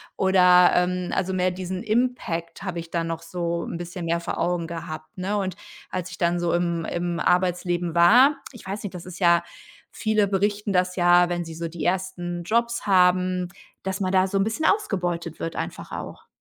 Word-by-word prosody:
Oder, 180 -2 +5
ähm, 180 0 0
also, 190 0 -1
mehr 185 0 +2
diesen 185 +1 -5
Impact 215 -8 -1
habe 185 -3 -4
ich 170 0 -7
da 170 -1 0
noch 165 0 -4
so 170 0 -3
'n - - -5
bisschen 175 0 -6
mehr 170 +1 0
vor 170 - -4
Augen 175 -2 -1
gehabt, 155 0 -7
ne? 200 +3 -1
Und 190 -2 -2 0.3
als 185 0 -4
ich 180 - -10
dann 175 0 +1
so 175 -1 0
im 170 -1 0
im 175 0 -2
Arbeitsleben 175 -1 +1
war 245 +12 +6 0.2
ich 235 - -13
weiß 200 +2 -4
nicht, 195 - -5
das 180 0 -8
ist 180 - -8
ja 170 -2 +4 0.5
viele 215 -2 +1
berichten 205 +1 0
das 180 0 +1
ja, 175 0 +5
wenn 175 -1 -2
sie 160 -1 -8
so 170 0 -4
die 165 -2 -7
1. 175 -1 -2
Jobs 235 +4 0
haben, 185 -1 +3 0.3
dass 190 +1 -3
man 185 0 0
da 190 0 +3
so 195 - -1
'n 195 - +3
bisschen 225 +9 -2
ausgebeutet 175 - -1
wird 165 - -4
einfach - - -5
auch. - - -7
180 Hz, 200 wpm, -24 LUFS, 170-190 Hz, 0.5 s, war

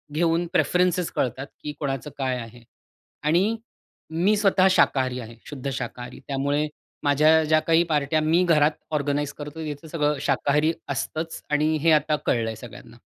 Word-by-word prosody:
घेऊन 170 +1 +1
प्रेफरन्सेस 180 -1 +2
कळतात 130 +2 -2 0.2
की 150 - -4
कोणाचं 135 -2 -3
काय 130 -2 -1
आहे. 120 0 -10 0.6
आणि 180 +9 +2 0.5
मी 180 +6 +2
स्वतः 195 -2 +4
शाकाहारी 130 -7 +2
आहे, 115 -1 -9
शुद्ध 140 -2 -5
शाकाहारी, 125 0 -6
त्यामुळे 140 +2 0 0.4
माझ्या 155 +3 +4
ज्या 155 0 +4
काही 165 +1 +5
पार्ट्या 150 +2 +1
मी 165 +4 +3
घरात 155 -3 +4 0.2
ऑर्गनाइझ 145 -1 -1
करतो, 150 +2 -8
तिथं 150 +2 -6
सगळं 150 -2 0
शाकाहारी 150 +3 +1 0.2
असतंच 160 +1 -3
आणि 155 +1 +2
हे 165 0 +4
आता 150 0 +3
कळलंय 115 -2 0
सगळ्यांना. - - -12
150 Hz, 145 wpm, -24 LUFS, 140-165 Hz, 0.6 s, काही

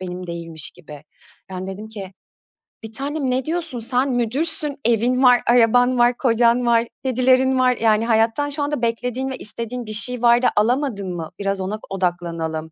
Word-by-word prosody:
benim 180 0 -6
değilmiş 165 -3 -5
gibi." 150 -4 -13 0.5
Yani, 185 0 -5
dedim 200 +3 -7
ki, 200 -3 -8 0.7
"Bir 220 - -8
tanem 275 +2 -3
ne 255 +1 -1
diyorsun? 320 -6 -3
Sen 250 +4 0
müdürsün, 285 +5 -1
evin 240 +3 +2
var, 245 -1 +6
araban 245 +1 +4
var, 240 0 +3
kocan 240 0 +2
var, 235 0 +3 0.2
kedilerin 260 +1 +3
var. 250 -1 +3
Yani, 220 0 +3
hayattan 230 +5 +1
şu 290 0 -3
anda 290 -3 -2
beklediğin 245 +3 -2
ve 260 - -5
istediğin 235 +2 -6
bir 215 - -5
şey 250 +2 -1
var 240 0 +5
da 250 - +4
alamadın 215 -5 0
mı? 165 -1 -6
Biraz 195 -1 -2
ona 205 +3 -4
odaklanalım." 170 -4 -3
235 Hz, 170 wpm, -21 LUFS, 195-255 Hz, 0.7 s, var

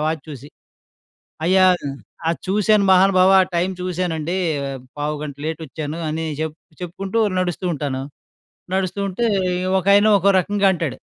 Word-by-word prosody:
Watch 155 -2 -2
చూసి. 145 -1 -9 1.0
"అయ్యా! 185 +1 +5 0.7
అది 170 - -3
చూశాను 210 +1 +3
మహానుభావా! 190 0 +5
ఆ - - -2
టైమ్ 180 +2 0
చూశానండి. 175 -2 -2 0.6
పావుగంట 150 -1 -4
లేట్ 160 +1 -4
వచ్చాను" 155 +2 -6
అని 160 +1 -3
చెప్ 160 0 -3 0.3
చెప్పుకుంటూ 195 +5 -4 0.2
నడుస్తూ 180 0 -3
ఉంటాను. 135 -2 -3 0.7
నడుస్తుంటే 195 +3 -2 0.6
ఒకాయన 200 +3 +4
ఒకో 195 - +2
రకంగా 200 +2 0
అంటాడు, 165 -6 -3
180 Hz, 120 wpm, -20 LUFS, 155-195 Hz, 1.0 s, అయ్యా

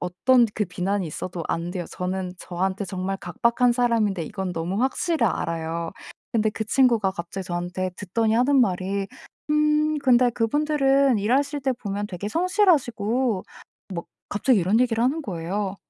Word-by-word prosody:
어떤 230 +8 +3
그 210 - 0
비난이 195 +2 -2
있어도 175 +2 -5
안 170 +1 -2
돼요. 180 -2 -3
저는 180 0 -3
저한테 190 +3 -2
정말 190 +1 -3
각박한 235 +7 +1
사람인데 230 -6 +1
이건 190 +2 -4
너무 175 +5 -2
확실히 265 0 +1
알아요. 165 -2 -2 0.4
근데 220 -2 +2
그 220 +1 -4
친구가 230 -4 +3
갑자기 180 +2 -6
저한테 180 +1 -3
듣더니 215 +3 0
하는 260 +4 +4
말이 195 -2 0 0.4
"음 300 0 +2
근데 250 -2 +4
그분들은 275 +1 +2
일하실 275 +7 +1
때 265 - +1
보면 205 -4 -4
되게 200 +1 -5
성실하시고" 260 - +1 0.5
뭐 170 - -4 0.2
갑자기 220 +3 +2
이런 190 +6 +2
얘기를 230 -2 +2
하는 280 +6 +1
거예요. 190 - -3
210 Hz, 335 characters per minute, -24 LUFS, 185-255 Hz, 0.5 s, 하는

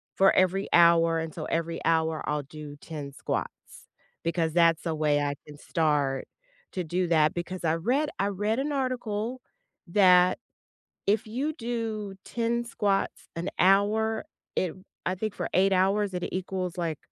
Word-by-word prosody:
for 195 0 +5
every 185 +2 +2
hour, 165 -1 +5
and 160 -1 -4
so 155 - -5
every 165 0 -2
hour, 160 -1 +1
I'll 150 -1 -1
do 150 0 -9
10 145 -3 -7
squats - - -5 0.4
because 165 -1 0
that's 165 -1 +4
a 160 -2 -1
way 150 -1 +2
I 145 0 -1
can 150 - -11
start 145 -4 0 0.5
to 185 - -2
do 175 +2 -1
that, 155 -2 +3
because 175 +1 -5
I 160 0 +2
read 255 - +1
I 200 - +2
read 210 +4 -1
an 290 +2 -1
article 250 -3 -2 0.5
that 180 -1 +5 0.7
if 210 +2 +2
you 265 +8 -2
do 225 - -3
10 235 0 -1
squats 205 -4 -1
an 170 +3 -3
hour, 210 +4 +3 0.3
it 180 -3 0 0.3
I 185 - 0
think 210 +2 -3
for - - -2
8 195 +1 +4
hours, 195 +1 +2
it 180 -1 -2
equals, 185 -1 -3
like, 165 -4 -2
185 Hz, 160 wpm, -27 LUFS, 165-210 Hz, 0.7 s, for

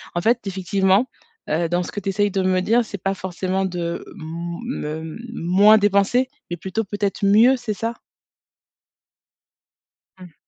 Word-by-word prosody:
en 175 - 0
fait, 230 +5 +3
effectivement, 190 +3 +2 0.4
heu, 165 +2 0
dans 175 +1 +1
ce - - -7
que 205 - -4
tu 195 - -3
essaies 205 +1 +1
de 195 -1 -1
me 185 0 +2
dire, 230 +4 +2
c'est 200 -3 -7
pas 195 +1 -1
forcément 190 +1 -2
de 175 -2 -4
m 170 +1 -6
me 160 - -5 0.2
moins 200 +4 +5
dépenser, 205 +5 +2 0.2
mais 175 - -2
plutôt 190 +6 -3
peut-être 205 0 -2
mieux, 225 +6 +6
c'est 230 -3 -3
ça? 230 +3 -3 2.2
Mmh. 180 -4 -13
195 Hz, 155 wpm, -22 LUFS, 175-210 Hz, 2.2 s, mieux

